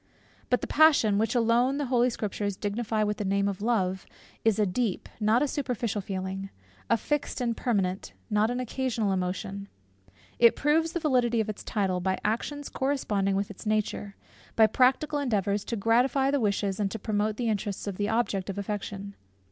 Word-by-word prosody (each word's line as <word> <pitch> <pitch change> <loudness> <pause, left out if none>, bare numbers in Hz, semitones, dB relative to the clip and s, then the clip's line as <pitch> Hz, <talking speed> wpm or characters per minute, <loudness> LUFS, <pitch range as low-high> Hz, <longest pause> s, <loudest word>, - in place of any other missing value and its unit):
But 250 - +2
the - - -2
passion, 285 -10 +4
which 225 +3 0
alone 240 +3 +3
the 290 - -1
Holy 250 -1 +3
Scriptures 205 -3 -3
dignify 215 +1 -1
with 210 0 -1
the - - -2
name 200 0 +1
of 200 -1 -3
Love, 190 -5 0 0.4
is 225 -3 +3
a 210 - +3
deep, 205 +1 -1
not 220 +4 +3
a - - +1
superficial 240 -7 -2
feeling; 190 0 -4 0.4
a - - +4
fixed 295 +4 -2
and 235 -2 0
permanent, 195 -6 -1
not 215 0 +2
an 245 +1 -2
occasional 245 -4 -1
emotion. 195 +2 -3 0.7
It 235 -1 +6
proves 320 +3 +2
the 345 - -1
validity 250 -7 +2
of 220 -1 0
its 215 - -6
title, 190 -4 -1
by 190 +1 0
actions 285 +7 -2
corresponding 210 -8 0
with 200 +1 -1
its 205 - -10
nature, 210 -1 -1 0.4
by 220 - +7
practical 265 +6 +2
endeavours 205 -6 0
to 235 - -3
gratify 250 +5 +2
the 285 - +2
wishes 200 -2 0
and 200 -2 +1
to 225 - -5
promote 210 0 -1
the 240 - -1
interests 205 -2 -2
of 200 -3 -4
the 205 0 -1
object 210 -4 0
of 195 - -4
affection. 200 0 -4
215 Hz, 180 wpm, -28 LUFS, 200-245 Hz, 0.7 s, by